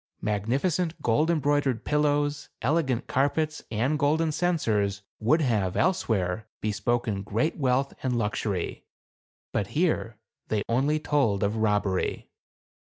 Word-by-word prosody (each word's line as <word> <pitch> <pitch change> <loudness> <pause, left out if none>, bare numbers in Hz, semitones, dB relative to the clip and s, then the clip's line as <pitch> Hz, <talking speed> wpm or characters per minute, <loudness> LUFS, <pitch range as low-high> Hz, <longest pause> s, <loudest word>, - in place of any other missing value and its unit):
Magnificent 140 - 0
gold 150 +8 +2
embroidered 145 -6 +1
pillows, 145 -1 +1
elegant 135 -3 +1
carpets, 155 +3 0
and 130 +7 0
golden 155 +3 +2
censers, 110 - 0 0.2
would 140 +9 +3
have, 105 -9 +1
else 185 -4 +1
where, 95 0 0
bespoken 110 0 -1
great 110 +10 -1
wealth 135 -1 +1
and 125 -2 0
luxury; 105 -4 -2 0.7
but 100 - -1
here 155 -10 +1 0.3
they 105 -2 0
only 140 +6 +2
told 135 -10 +1
of 105 +2 0
robbery. 105 -3 0
125 Hz, 115 wpm, -27 LUFS, 105-150 Hz, 0.7 s, would